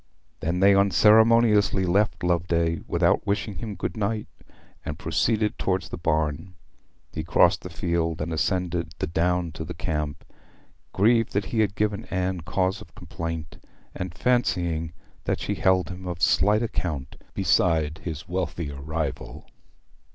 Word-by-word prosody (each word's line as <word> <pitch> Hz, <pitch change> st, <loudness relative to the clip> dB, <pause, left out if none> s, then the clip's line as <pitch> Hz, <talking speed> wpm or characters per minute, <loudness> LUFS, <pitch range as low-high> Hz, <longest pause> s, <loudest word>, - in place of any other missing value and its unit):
They 80 Hz, -, -3 dB
then 90 Hz, +3 st, 0 dB
unceremoniously 105 Hz, 0 st, +5 dB
left 90 Hz, -2 st, +1 dB
Loveday, 85 Hz, -1 st, +1 dB
without -, -, +2 dB
wishing 100 Hz, 0 st, -1 dB
him 110 Hz, -4 st, -5 dB
good 90 Hz, 0 st, -4 dB
night, 105 Hz, 0 st, -2 dB, 0.6 s
and -, -, -5 dB
proceeded 110 Hz, -2 st, 0 dB
towards 95 Hz, 0 st, -1 dB
the -, -, -6 dB
barn. 80 Hz, +3 st, -1 dB, 0.6 s
He 80 Hz, -, -3 dB
crossed 80 Hz, -, +3 dB
the -, -, -7 dB
park 85 Hz, -2 st, -1 dB
and 80 Hz, +2 st, -3 dB
ascended 85 Hz, -2 st, -1 dB
the -, -, -1 dB
down 85 Hz, +1 st, 0 dB
to 80 Hz, -, -6 dB
the -, -, -7 dB
camp, 75 Hz, -1 st, -3 dB, 0.7 s
grieved 115 Hz, +3 st, +3 dB
that 100 Hz, 0 st, 0 dB
he 115 Hz, -, +1 dB
had 105 Hz, -3 st, +1 dB
given 105 Hz, +1 st, -1 dB
Anne 95 Hz, -5 st, -2 dB
cause 95 Hz, +3 st, -1 dB
of 80 Hz, -, -15 dB
complaint, 85 Hz, -2 st, -6 dB, 0.3 s
and 90 Hz, -2 st, -5 dB
fancying 85 Hz, -10 st, 0 dB, 0.3 s
that -, -, 0 dB
she -, -, -2 dB
held 95 Hz, 0 st, +2 dB
him 90 Hz, 0 st, -8 dB
of 85 Hz, -2 st, -4 dB
slight 105 Hz, -, +3 dB
account 75 Hz, -, -3 dB, 0.2 s
beside 80 Hz, -3 st, +2 dB
his 80 Hz, -2 st, -6 dB
wealthier 85 Hz, -5 st, -3 dB
rival. 80 Hz, -1 st, -4 dB
90 Hz, 145 wpm, -25 LUFS, 80-100 Hz, 0.7 s, unceremoniously